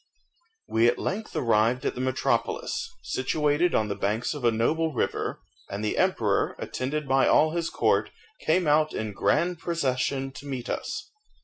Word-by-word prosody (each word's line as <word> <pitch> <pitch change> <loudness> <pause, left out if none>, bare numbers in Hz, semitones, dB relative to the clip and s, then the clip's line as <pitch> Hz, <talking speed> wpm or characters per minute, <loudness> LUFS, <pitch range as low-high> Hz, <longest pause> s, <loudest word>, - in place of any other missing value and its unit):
We 115 +1 +3
at 120 - +2
length 215 +3 -4
arrived 115 +2 +2
at - - 0
the 125 - -5
metropolis, 435 - -1
situated 150 +5 +1
on 110 - +2
the 100 - -1
banks 105 +7 -1
of 145 -4 -7
a 120 - +5
noble 155 +9 +1
river, - - -2 0.3
and 100 +2 -3
the 105 - 0
emperor, - - +1
attended 140 +3 -3
by 135 0 +4
all 155 +1 +5
his 170 0 -1
court, - - +2 0.3
came 175 +3 +2
out 155 +1 +3
in 110 -1 -3
grand 170 - +1
procession 135 -5 -1
to 145 +1 -10
meet 130 -3 -4
us. 410 -1 -4
135 Hz, 165 wpm, -26 LUFS, 120-165 Hz, 0.3 s, a